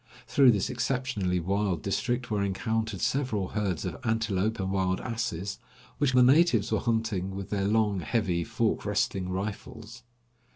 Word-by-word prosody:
Through 135 -2 +5
this 105 +1 +2
exceptionally 125 -8 -1
wild 95 -1 -1
district 120 +4 -1
were 105 -1 +1
encountered 110 +1 -2
several 120 -9 0
herds 100 -6 -2
of - - -4
antelope 110 -2 0
and 95 0 -2
wild 95 -1 0
asses, 105 -5 -3 0.4
which 145 -3 +2
the 125 0 +6
natives 130 - +4
were 110 - +2
hunting 110 -5 -1
with 100 -1 -6
their 100 -1 0
long, 105 -2 +2
heavy, 90 -2 0
fork - - -1
resting 95 -2 -1
rifles. 105 +4 -6
105 Hz, 150 wpm, -28 LUFS, 95-115 Hz, 0.4 s, the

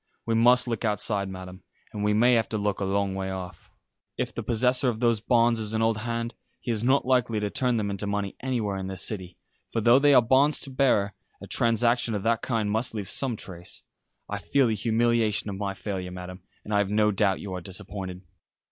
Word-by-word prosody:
We 115 - 0
must 125 +2 +4
look 115 -2 -2
outside, 105 -2 0
Madam, 95 0 -9 0.3
and 105 - -4
we 105 - +2
may 120 +4 +4
have 115 -2 +2
to 110 - -2
look 105 -1 -1
a 100 - -1
long 100 0 0
way 95 0 -3
off. 90 -3 -7 0.5
If - - -2
the - - -4
possessor 125 +2 +2
of 110 -2 -3
those 115 -2 +2
bonds 115 0 +3
is 110 0 -3
an 110 - +1
old 115 -1 +1
hand, 115 +1 -3 0.3
he 120 - -3
is 110 -1 -1
not 130 +3 +3
likely 125 -4 +2
to 105 -1 -2
turn 125 -4 +1
them 100 -2 -1
into 100 +1 -3
money 100 -1 -2
anywhere 115 -7 -2
in 95 0 -4
this 95 -1 -2
City; 95 -4 -5 0.3
for 115 - -1
though 120 +3 +5
they 145 0 +5
are - - +8
bonds 135 +5 +3
to 135 - -7
bearer, 125 -7 +2 0.3
a - - -9
transaction 115 0 +1
of 100 - -3
that 115 0 +1
kind 110 -4 -1
must 110 +2 -1
leave 100 -3 -3
some 130 -1 0
trace. 90 -4 -7 0.4
I 105 - -4
feel 125 +10 +2
the 115 - +1
humiliation 110 -1 +1
of 95 - -6
my 100 -1 -3
failure, 95 -3 -4
Madam, 90 0 -8 0.2
and 105 - -4
I 100 - +3
have 100 -1 0
no 105 0 +3
doubt 95 -1 +1
you 100 -2 -6
are 90 - -4
disappointed." 95 0 -6
105 Hz, 225 wpm, -26 LUFS, 100-120 Hz, 0.5 s, are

